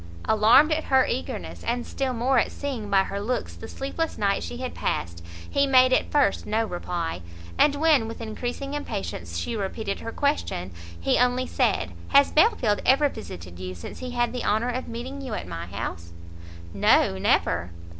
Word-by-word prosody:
Alarmed 230 Hz, +8 st, +5 dB
at 310 Hz, 0 st, 0 dB
her 265 Hz, -1 st, +4 dB
eagerness, 85 Hz, -1 st, -4 dB
and 245 Hz, 0 st, -1 dB
still 270 Hz, -1 st, -2 dB
more 250 Hz, +2 st, +2 dB
at -, -, 0 dB
seeing 255 Hz, -8 st, -5 dB
by 195 Hz, -1 st, +4 dB
her 200 Hz, +1 st, -4 dB
looks 245 Hz, +4 st, -2 dB
the -, -, -9 dB
sleepless 310 Hz, +4 st, -3 dB
night 200 Hz, -1 st, +1 dB
she 240 Hz, -, -6 dB
had 255 Hz, 0 st, -4 dB
passed, 85 Hz, 0 st, -3 dB, 0.2 s
he 280 Hz, 0 st, +2 dB
made 255 Hz, -1 st, +6 dB
at -, -, +2 dB
first 280 Hz, -9 st, +2 dB
no 220 Hz, +2 st, +1 dB
reply; 175 Hz, -, -4 dB, 0.3 s
and 290 Hz, -1 st, +4 dB
when, 295 Hz, -6 st, +3 dB
with 225 Hz, -, -7 dB
increasing 245 Hz, +5 st, -4 dB
impatience, 195 Hz, -, -4 dB
she 230 Hz, -, -3 dB
repeated 200 Hz, 0 st, -3 dB
her 230 Hz, -, -6 dB
question, 280 Hz, -, -1 dB, 0.3 s
he 85 Hz, -, +2 dB
only 250 Hz, +1 st, +2 dB
said, -, -, 0 dB, 0.2 s
"Has 280 Hz, 0 st, +5 dB
Belfield 305 Hz, -, +3 dB
ever 280 Hz, +3 st, +4 dB
visited 90 Hz, -, -9 dB
you 90 Hz, 0 st, -5 dB
since 85 Hz, -, -9 dB
he 255 Hz, -, -5 dB
had 240 Hz, 0 st, 0 dB
the 250 Hz, -, -3 dB
honour 220 Hz, +4 st, +1 dB
of 255 Hz, +1 st, -3 dB
meeting 250 Hz, +4 st, -6 dB
you 255 Hz, -6 st, -4 dB
at -, -, -5 dB
my 85 Hz, -1 st, -6 dB
house?" 85 Hz, -2 st, -6 dB, 0.6 s
"No, 95 Hz, -, +3 dB
never." 85 Hz, -2 st, +1 dB
230 Hz, 180 wpm, -25 LUFS, 175-265 Hz, 0.6 s, made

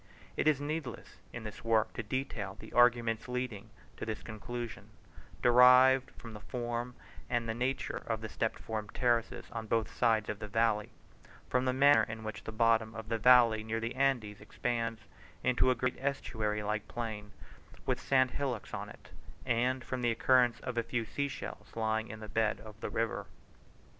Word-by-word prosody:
It -, -, 0 dB
is 150 Hz, -3 st, +4 dB
needless 145 Hz, -3 st, -5 dB
in 120 Hz, -, -7 dB
this 105 Hz, -1 st, -8 dB
work 115 Hz, -1 st, +2 dB
to -, -, -3 dB
detail 110 Hz, -4 st, -3 dB
the -, -, -11 dB
arguments 120 Hz, -2 st, +3 dB
leading 125 Hz, -4 st, -4 dB, 0.3 s
to -, -, -6 dB
this 110 Hz, -1 st, -4 dB
conclusion, 120 Hz, +2 st, -6 dB, 0.5 s
derived 125 Hz, +2 st, +7 dB
from 115 Hz, -2 st, -9 dB
the 105 Hz, -, -8 dB
form 120 Hz, +1 st, -4 dB, 0.3 s
and 120 Hz, -2 st, 0 dB
the 110 Hz, -, -1 dB
nature 125 Hz, +4 st, -2 dB
of -, -, -1 dB
the -, -, -4 dB
step -, -, -2 dB
formed 110 Hz, -2 st, -5 dB
terraces 120 Hz, -3 st, +1 dB
on 115 Hz, -1 st, -5 dB
both 115 Hz, 0 st, 0 dB
sides 110 Hz, -3 st, +2 dB
of 105 Hz, -1 st, -4 dB
the 105 Hz, -, -5 dB
valley, 110 Hz, 0 st, +1 dB, 0.6 s
from 125 Hz, 0 st, +2 dB
the 130 Hz, -, +3 dB
manner 140 Hz, +3 st, +6 dB
in 110 Hz, 0 st, -4 dB
which 110 Hz, -1 st, -6 dB
the -, -, -4 dB
bottom 110 Hz, 0 st, +2 dB
of 110 Hz, 0 st, -7 dB
the 115 Hz, -1 st, 0 dB
valley 120 Hz, -2 st, +6 dB
near 110 Hz, +1 st, -2 dB
the 115 Hz, +1 st, -3 dB
Andes 125 Hz, -7 st, 0 dB
expands 115 Hz, +1 st, -2 dB, 0.4 s
into 125 Hz, 0 st, +3 dB
a 130 Hz, -, +3 dB
great 125 Hz, +1 st, -1 dB
estuary 110 Hz, -6 st, -2 dB
like 105 Hz, +1 st, -2 dB
plain 110 Hz, -3 st, -5 dB, 0.5 s
with -, -, 0 dB
sand 130 Hz, -2 st, +3 dB
hillocks 125 Hz, -5 st, -3 dB
on -, -, -4 dB
it, -, -, -14 dB, 0.4 s
and 125 Hz, +2 st, +1 dB
from 130 Hz, -1 st, -4 dB
the 120 Hz, -, +2 dB
occurrence 120 Hz, +1 st, +3 dB
of 120 Hz, -2 st, -2 dB
a -, -, +3 dB
few 115 Hz, 0 st, -2 dB
sea 140 Hz, +6 st, -2 dB
shells 135 Hz, -1 st, -8 dB
lying 110 Hz, 0 st, 0 dB
in 110 Hz, 0 st, -8 dB
the 110 Hz, -, -7 dB
bed 110 Hz, 0 st, 0 dB
of 110 Hz, -1 st, -12 dB
the -, -, -3 dB
river. 115 Hz, -1 st, -2 dB
115 Hz, 185 wpm, -32 LUFS, 110-125 Hz, 0.6 s, derived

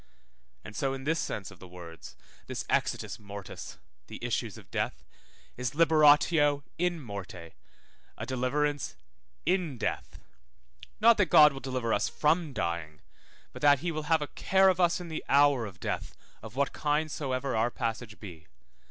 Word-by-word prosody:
And 110 Hz, -, -10 dB
so 135 Hz, +4 st, -1 dB
in 135 Hz, -, -8 dB
this 160 Hz, +3 st, 0 dB
sense 105 Hz, -6 st, -4 dB
of 95 Hz, -, -15 dB
the 95 Hz, -, -11 dB
words, 85 Hz, -2 st, -11 dB, 0.3 s
this -, -, -4 dB
exitus -, -, -1 dB
mortis, 100 Hz, -1 st, -9 dB, 0.3 s
the -, -, -8 dB
issues -, -, -2 dB
of -, -, -15 dB
death, -, -, -2 dB, 0.5 s
is 125 Hz, +3 st, -3 dB
liberatio 150 Hz, -2 st, +5 dB, 0.2 s
in 175 Hz, -1 st, 0 dB
morte, 95 Hz, -, -8 dB, 0.7 s
a -, -, -5 dB
deliverance 140 Hz, +3 st, -1 dB, 0.5 s
in 175 Hz, -5 st, 0 dB
death; -, -, -3 dB, 0.8 s
not 230 Hz, +1 st, +6 dB
that 205 Hz, -4 st, +3 dB
God 150 Hz, -1 st, +7 dB
will 135 Hz, -, -6 dB
deliver 130 Hz, -4 st, -2 dB
us 105 Hz, -, +1 dB
from 160 Hz, +1 st, +1 dB
dying, 85 Hz, -, -3 dB, 0.5 s
but -, -, -10 dB
that 145 Hz, -2 st, +5 dB
he 175 Hz, 0 st, -1 dB
will 155 Hz, -1 st, -4 dB
have 160 Hz, -2 st, +3 dB
a -, -, -5 dB
care 190 Hz, +5 st, +3 dB
of 185 Hz, -1 st, +1 dB
us 175 Hz, 0 st, +3 dB
in 175 Hz, -, -7 dB
the 160 Hz, -1 st, -5 dB
hour 140 Hz, -4 st, +4 dB
of 95 Hz, -, -12 dB
death, -, -, -4 dB, 0.2 s
of 110 Hz, +1 st, -10 dB
what 140 Hz, +1 st, 0 dB
kind 150 Hz, +1 st, 0 dB
soever 135 Hz, -2 st, -2 dB
our 110 Hz, +2 st, +2 dB
passage 115 Hz, -2 st, -4 dB
be. 85 Hz, -6 st, -11 dB
140 Hz, 165 wpm, -29 LUFS, 110-155 Hz, 0.8 s, God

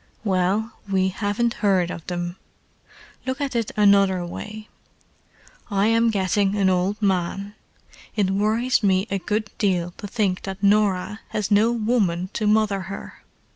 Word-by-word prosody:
"Well, 195 Hz, +3 st, 0 dB, 0.2 s
we 190 Hz, -1 st, +2 dB
haven't 205 Hz, +4 st, -1 dB
heard 190 Hz, -4 st, +2 dB
of 165 Hz, -, -8 dB
them. 175 Hz, 0 st, -4 dB, 0.9 s
Look 260 Hz, +1 st, -2 dB
at 280 Hz, -3 st, -2 dB
it 230 Hz, -2 st, 0 dB
another 200 Hz, -3 st, +4 dB
way. 215 Hz, +4 st, -8 dB, 1.0 s
I 200 Hz, -1 st, +1 dB
am 230 Hz, 0 st, +3 dB
getting 200 Hz, -1 st, +1 dB
an 195 Hz, -2 st, +3 dB
old 185 Hz, +3 st, 0 dB
man; 195 Hz, +1 st, 0 dB, 0.6 s
it 200 Hz, -3 st, +1 dB
worries 220 Hz, +6 st, +1 dB
me 190 Hz, -2 st, +2 dB
a 195 Hz, -, 0 dB
good 210 Hz, +3 st, -2 dB
deal 180 Hz, -4 st, +1 dB
to 205 Hz, -, -7 dB
think 195 Hz, -3 st, 0 dB
that 195 Hz, 0 st, -7 dB
Norah 205 Hz, 0 st, +2 dB
has 210 Hz, -1 st, -3 dB
no 210 Hz, +3 st, +4 dB
woman 210 Hz, -6 st, 0 dB
to 215 Hz, -, -1 dB
mother 210 Hz, -2 st, +2 dB
her. 195 Hz, -, -8 dB
200 Hz, 145 wpm, -23 LUFS, 190-215 Hz, 1.0 s, another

